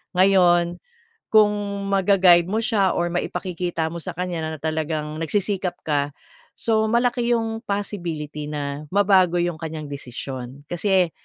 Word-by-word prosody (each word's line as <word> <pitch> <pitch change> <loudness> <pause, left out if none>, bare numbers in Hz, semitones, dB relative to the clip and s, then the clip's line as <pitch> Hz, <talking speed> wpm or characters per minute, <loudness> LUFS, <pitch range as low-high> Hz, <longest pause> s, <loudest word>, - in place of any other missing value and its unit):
Ngayon, 175 -2 +4 0.5
kung 215 -1 +6 0.4
ma-gaguide 190 -3 +5
mo 215 - 0
siya 200 -5 +2
or 175 0 0
maipakikita 175 -2 -2
mo 170 - -5
sa 180 0 -5
kanya 175 -1 -3
na 160 0 -4
talagang 155 -1 -2
nagsisikap 190 0 -1
ka, 145 -1 0 0.5
so, 220 -1 +2
malaki 240 0 +1
yung 225 0 -2
possibility 170 -8 -4
na 145 0 -4
mabago 190 -3 +4
yung 175 0 0
kanyang 155 -2 -5
desisyon. 130 0 -7
Kasi 180 -1 +2
175 Hz, 130 wpm, -23 LUFS, 155-200 Hz, 0.5 s, kung